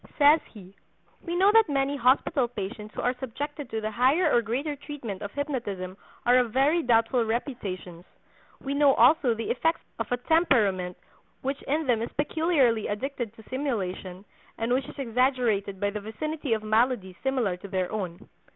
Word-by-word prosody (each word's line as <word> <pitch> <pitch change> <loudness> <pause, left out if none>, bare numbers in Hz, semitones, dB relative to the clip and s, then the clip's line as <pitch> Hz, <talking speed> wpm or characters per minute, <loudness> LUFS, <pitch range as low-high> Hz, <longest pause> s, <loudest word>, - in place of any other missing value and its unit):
Says 295 +2 +7
he: 195 -3 -13 0.5
"We 340 -1 -4
know 385 +3 +5
that 445 -5 +5
many 275 0 +1
hospital 260 +1 +2
patients 210 -1 -7
who - - -3
are 250 - +2
subjected 285 +2 -5
to 220 0 -3
the 215 0 -2
higher 275 - +3
or 240 - +5
greater 265 +7 -2
treatment 270 -9 -7
of 205 - -5
hypnotism 220 -11 -3 0.3
are 245 +1 +6
of 245 -3 0
very 280 +7 +3
doubtful 235 -1 +3
reputations; 205 - -4 0.6
we 275 - -4
know 285 -1 +4
also 275 -7 +5
the 225 0 -3
effects 325 +6 0 0.2
of - - -4
a 245 - +2
temperament 225 - +2 0.5
which 275 +1 -2
in 305 +3 0
them 240 -4 +2
is 230 - -4
peculiarly 290 -7 +1
addicted 235 +1 -4
to 220 - -16
simulation, 195 -8 -3 0.3
and 230 +2 0
which 255 0 0
is - - -12
exaggerated 240 -6 0
by 205 0 0
the 210 0 -5
vicinity 285 +6 -3
of 220 -1 -2
maladies 215 -3 +1
similar 255 -8 0
to 200 - -10
their 185 -2 -2
own. 185 -5 -5
245 Hz, 170 wpm, -27 LUFS, 210-280 Hz, 0.6 s, Says